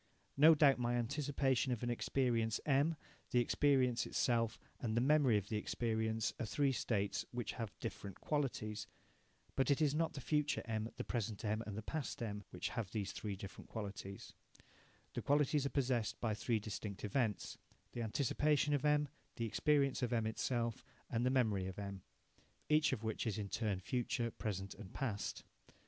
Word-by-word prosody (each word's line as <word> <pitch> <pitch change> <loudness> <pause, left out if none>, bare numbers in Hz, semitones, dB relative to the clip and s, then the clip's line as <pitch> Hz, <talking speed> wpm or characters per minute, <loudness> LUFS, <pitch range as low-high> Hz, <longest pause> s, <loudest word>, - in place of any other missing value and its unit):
No 155 +3 +8
doubt 140 -3 +5
my 120 0 +1
anticipation 135 +1 +1
of 120 -1 -2
an 120 - 0
experience 115 -2 +1
M, 145 +3 +3 0.3
the 125 - +3
experience 125 -2 +3
itself, 115 -2 +1 0.2
and 115 -2 -1
the - - +6
memory 135 -3 +5
of 100 0 -3
the 110 - 0
experience 110 0 0
are 115 - -1
three 140 +4 +2
states 105 -4 0
which 120 -4 -3
have 115 -4 -5
different 100 -3 -6
qualities. 110 -8 -2 0.7
But 135 - +2
it 140 - +4
is 150 -3 +3
not 165 +1 +1
the 140 - -5
future 145 +1 +1
M, 110 -1 -2
the - - -2
present 110 -3 -3
M, 110 +1 0
and 105 -1 -4
the 110 - -4
past 150 +2 -3
M, 105 -2 -4
which - - -3
have 110 -5 -3
these 100 -2 -2
three 105 -2 -4
different 100 +1 -9
qualities. 100 -2 -6 0.8
The - - -2
qualities 145 0 +3
are - - -2
possessed 125 -6 0
by 115 -2 0
three 115 +2 0
distinct 105 -1 -5
events 105 -1 -1 0.3
the 120 - -4
anticipation 145 +5 +2
of 145 - +1
M, 150 0 +3 0.3
the 115 - -2
experience 140 +3 +2
M 120 -2 +1
itself, 115 +1 -1 0.3
and 115 0 +1
the 125 - +3
memory 110 -8 +2
of 95 - -6
M, 100 -2 -5 0.7
each 155 0 +4
of 120 -5 -2
which 110 +1 -2
is 105 -2 -1
in 100 -2 -3
turn 105 -4 -1
future, 120 +2 -1
present, 100 -3 -4
and 100 -4 -11
past. 115 -7 -2
115 Hz, 175 wpm, -37 LUFS, 105-135 Hz, 0.8 s, No